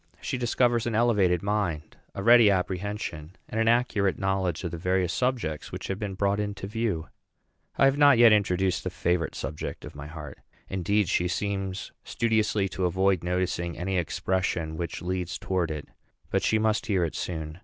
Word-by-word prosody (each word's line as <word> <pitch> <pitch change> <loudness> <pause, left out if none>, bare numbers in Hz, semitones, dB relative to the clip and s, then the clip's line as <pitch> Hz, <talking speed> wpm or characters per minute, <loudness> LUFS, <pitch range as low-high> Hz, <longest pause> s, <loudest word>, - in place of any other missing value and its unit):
She 130 - -3
discovers 120 -1 +2
an 115 - -1
elevated 100 -7 +3
mind, 100 -7 -2 0.2
a 100 - -4
ready 115 -1 +7
apprehension, 95 -3 -2
and 110 - -1
an 115 - +1
accurate 115 -5 +2
knowledge 95 -3 -1
of 85 - -3
the 85 - -5
various 90 0 +1
subjects 120 - -1
which - - -6
have 95 0 -2
been 100 -3 -4
brought 100 +1 +1
into 100 -2 -3
view. 100 -8 -2 0.7
I - - +5
have 135 +1 +3
not 145 -3 +7
yet 115 -2 +8
introduced 95 -3 +1
the 90 - -2
favorite 90 -2 -1
subject 75 +3 -5
of - - -9
my 70 0 -8
heart. 75 -1 -9 0.3
Indeed, 95 +2 +1
she 90 0 +1
seems 95 +1 -3
studiously 110 -3 +1
to 95 0 -2
avoid 95 0 +2
noticing 90 -1 -1
any 95 +1 -1
expression 85 -1 -1
which 85 +1 -5
leads 90 -1 -2
towards 90 -4 -1
it; 75 -1 -5 0.4
but - - +2
she 110 - +2
must 110 0 +1
hear 95 -5 +2
it 80 - -2
soon. 80 -1 -5
95 Hz, 175 wpm, -27 LUFS, 85-105 Hz, 0.7 s, yet